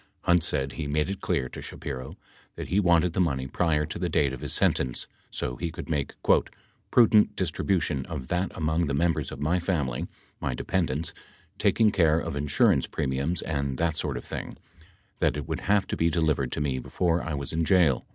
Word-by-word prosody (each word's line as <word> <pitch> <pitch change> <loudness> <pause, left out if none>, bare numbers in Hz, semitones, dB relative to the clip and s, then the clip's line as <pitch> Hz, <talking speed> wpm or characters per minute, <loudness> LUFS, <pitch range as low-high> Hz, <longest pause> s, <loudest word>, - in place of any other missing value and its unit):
Hunt 90 -1 +4
said 70 -4 -1
he 75 - -4
made 75 +5 0
it 100 - -6
clear 65 - 0
to - - -8
Shapiro 65 -2 -6 0.4
that - - -6
he 95 - +3
wanted 85 -3 +3
the - - -1
money 70 -7 0
prior 75 +1 +1
to - - -6
the - - -1
date 70 -3 +2
of 65 - -7
his - - -3
sentence 65 -2 +1 0.2
so 60 - -3
he 85 - -2
could 80 - -7
make 70 -3 -1 0.7
"prudent 110 -3 +5
distribution 85 -6 0
of 65 - -5
that 90 +2 0
among 80 0 +1
the 70 - 0
members 85 +3 0
of - - -7
my 80 +5 +1
family, 75 -9 -1 0.3
my 70 -4 -2
dependents, 85 +1 -1 0.5
taking 110 -2 +4
care 80 -5 +3
of 70 - -4
insurance 70 0 +2
premiums 70 +5 -1
and 70 -4 -2
that 85 -2 +1
sort 75 -5 -1
of - - -8
thing, - - -6 0.6
that - - +2
it 75 - -5
would - - -2
have 100 -1 +4
to - - -3
be 85 - +2
delivered 75 -6 +1
to - - -2
me 70 -3 0
before 85 +6 0
I 80 -2 -3
was 70 +1 -4
in 80 +1 +1
jail." 80 -8 +3
80 Hz, 200 wpm, -27 LUFS, 70-85 Hz, 0.7 s, prudent